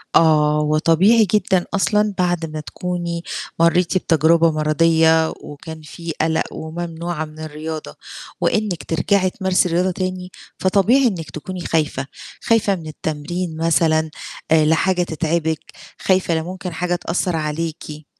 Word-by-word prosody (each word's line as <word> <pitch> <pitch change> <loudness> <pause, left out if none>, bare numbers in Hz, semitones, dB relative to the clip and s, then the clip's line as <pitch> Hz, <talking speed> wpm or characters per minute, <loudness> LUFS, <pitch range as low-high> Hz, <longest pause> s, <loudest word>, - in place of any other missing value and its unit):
آه، 150 -2 +4
وطبيعي 165 +9 +4
جدًا 190 -4 +2
أصلًا 210 +1 +2
بعد 175 -2 0
ما 155 - -5
تكوني 170 +1 -4 0.4
مرّيتِ 170 +2 +3
بتجربة 165 -1 +3
مَرَضِية، 160 +1 +3
وكان 160 +2 -9
في 165 +2 -7
قلق، 160 0 +1
وممنوعة 165 0 -4
من 155 0 -14
الرياضة 155 0 -6 0.5
وإنِّك 200 -8 0
ترجعي 185 +3 +1
تمارسي 185 -1 +1
رياضة 180 +3 +1
تاني، 185 0 -4 0.3
فطبيعي 210 +8 +3
إنِّك 175 -8 -3
تكوني 180 +4 -6
خايفة، 150 -4 -1 0.3
خايفة 220 -3 +2
من 165 -4 -8
التمرين 160 +3 -4
مثلًا، 160 -1 +2 0.4
آآ 160 -1 +5
لا 160 +1 +4
حاجة 180 +1 +1
تتعبِك، 160 -1 -2 0.3
خايفة 185 -2 +2
لا 160 - 0
ممكن 180 0 -6
حاجة 175 +2 -1
تأثّر 175 0 -1
عليكِ. 155 0 -4
165 Hz, 130 wpm, -20 LUFS, 155-180 Hz, 0.5 s, آآ